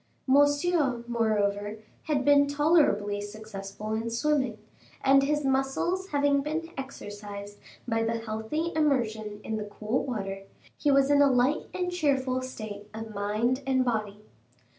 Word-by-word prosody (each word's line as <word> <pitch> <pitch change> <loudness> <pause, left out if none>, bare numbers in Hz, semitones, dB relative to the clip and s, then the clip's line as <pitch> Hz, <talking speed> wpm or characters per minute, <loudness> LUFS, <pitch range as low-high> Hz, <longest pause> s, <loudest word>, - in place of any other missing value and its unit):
Monsieur, 285 -1 +3
moreover, 210 -3 0 0.3
had 285 -4 0
been 285 0 +6
tolerably 285 -9 +2
successful 205 0 -7
in 225 +1 -2
swimming, 260 -1 0 0.5
and 275 0 +6
his 295 +1 0
muscles 270 +8 0
having 285 -3 +2
been 320 +3 -3
exercised 205 -6 -8 0.3
by 225 -1 +1
the 225 0 0
healthy 225 +9 -3
immersion 220 -9 0
in 220 - -3
the 215 - -3
cool 215 +4 -2
water, 195 -6 -4 0.3
he 295 - 0
was 275 0 +4
in 285 0 +5
a 285 - +6
light 255 +4 +2
and 360 -1 -2
cheerful 270 -7 +1
state 215 -5 -7
of 220 0 -6
mind 215 +6 0
and 260 -1 +2
body. 210 -3 -2
250 Hz, 140 wpm, -28 LUFS, 215-285 Hz, 0.5 s, been